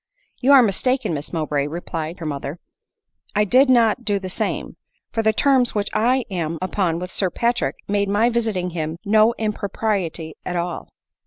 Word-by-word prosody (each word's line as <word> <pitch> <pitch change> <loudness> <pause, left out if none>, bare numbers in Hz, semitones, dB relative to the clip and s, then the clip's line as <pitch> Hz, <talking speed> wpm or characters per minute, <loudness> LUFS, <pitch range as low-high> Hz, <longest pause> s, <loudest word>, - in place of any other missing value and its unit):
You 265 +2 +3
are 265 -2 +8
mistaken, 240 +1 +1
Miss 145 -1 -4
Mowbray," 150 -4 -1
replied 165 +1 -5
her 165 - -7
mother; 145 +1 -4 0.4
" - - -37
I 210 - +4
did 255 +7 +4
not 240 -1 +4
do 205 -3 0
the 190 -1 -5
same; - - -3 0.4
for 225 - 0
the 220 0 +3
terms 255 0 +2
which 205 -1 0
I 245 +4 +2
am 165 -3 -2
upon 185 -2 -1
with 180 +2 -6
Sir 190 - +1
Patrick 235 +6 0
made 200 0 0
my 210 +4 +3
visiting 215 -6 -1
him 160 -1 -3
no 215 +3 +4
im 215 -1 -1
propriety 190 -6 -2
at 180 - -4
all." 175 0 -3
200 Hz, 180 wpm, -21 LUFS, 170-225 Hz, 0.4 s, are